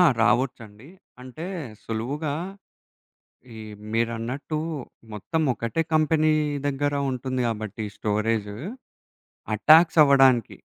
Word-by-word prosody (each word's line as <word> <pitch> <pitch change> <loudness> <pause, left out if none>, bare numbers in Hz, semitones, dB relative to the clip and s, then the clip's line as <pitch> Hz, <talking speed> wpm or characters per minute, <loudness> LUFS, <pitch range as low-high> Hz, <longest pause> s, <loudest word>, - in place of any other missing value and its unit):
ఆ! - - +8 0.2
రావచ్చండి. 115 0 -1 0.3
అంటే 130 +6 -8 0.4
సులువుగా, 140 +7 -3 1.2
ఈ - - -9 0.3
మీరన్నట్టు, 115 +6 -2 0.5
మొత్తం 160 - -2
ఒకటే 120 +7 -2
కంపెనీ 155 0 +3 0.3
దగ్గర 145 +1 -1 0.2
ఉంటుంది 130 0 -3
కాబట్టి 110 -1 -4
స్టోరేజు. 105 0 -1 1.0
అటాక్స్ 160 +8 +6
అవ్వడానికి. 135 -5 +4
125 Hz, 85 wpm, -25 LUFS, 115-145 Hz, 1.2 s, ఆ